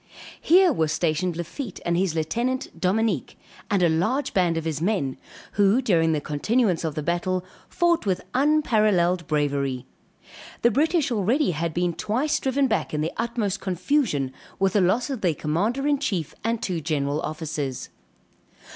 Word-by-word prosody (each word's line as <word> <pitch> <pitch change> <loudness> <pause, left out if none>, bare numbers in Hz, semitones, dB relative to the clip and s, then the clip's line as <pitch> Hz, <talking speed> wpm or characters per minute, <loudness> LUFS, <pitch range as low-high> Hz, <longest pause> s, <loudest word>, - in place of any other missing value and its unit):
Here 360 0 +5
was 160 -8 0
stationed 165 +1 0
Lafitte 190 - -6
and 170 - +1
his 180 -2 0
lieutenant 235 +11 -2
Dominique 195 - 0 0.3
and 195 -3 +2
a - - +6
large 225 - 0
band 175 -3 +2
of 165 - -3
his 155 -2 -2
men, 170 -9 0 0.4
who 205 +3 +3
during 170 -10 +2
the 155 - +1
continuance 180 - 0
of 160 -3 -2
the 155 - -3
battle, 180 +2 -1 0.2
fought 340 -8 +1
with 185 -2 -1
unparalleled 215 - +2
bravery. 140 -4 -1 0.8
The 235 - +5
British 305 - +1
already 235 +5 +2
had 165 +1 -2
been 175 +1 0
twice 245 - 0
driven 270 +1 +1
back 220 - -1
in 150 - -1
the 160 - -2
utmost 225 -4 -1
confusion, 185 - 0 0.2
with 195 -1 +1
the 205 - +3
loss 220 +10 +1
of 255 -5 -4
their 170 -5 +1
commander 205 - -1
in 290 -1 +2
chief, 190 - -2
and 230 +1 0
two 175 -4 -2
general 145 -1 -1
officers. 150 -4 -4
185 Hz, 160 wpm, -24 LUFS, 160-235 Hz, 0.8 s, a